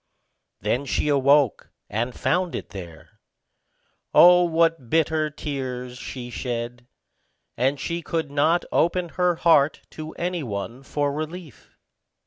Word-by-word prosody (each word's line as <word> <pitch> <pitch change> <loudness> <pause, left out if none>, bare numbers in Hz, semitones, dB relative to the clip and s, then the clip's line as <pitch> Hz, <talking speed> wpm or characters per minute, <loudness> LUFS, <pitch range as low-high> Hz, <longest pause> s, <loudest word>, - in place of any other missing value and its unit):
Then 130 +4 0
she 150 - 0
awoke, 140 -2 +3 0.2
and 120 +4 -3
found 180 -1 0
it - - -6
there. 85 -6 -11 1.0
Oh, 180 0 +8
what 165 -6 +1
bitter 160 0 +2
tears 130 -4 -5
she 125 -2 -7
shed! 120 0 -5 0.7
and 135 +3 0
she 170 +4 -3
could 160 -3 -3
not 160 +4 +2
open 175 +1 +1
her 180 +1 +1
heart 160 -3 +3
to 155 0 -8
any 175 0 -2
one 115 +1 -5
for 145 +1 -1
relief. 155 - -8
145 Hz, 120 wpm, -24 LUFS, 125-165 Hz, 1.0 s, Oh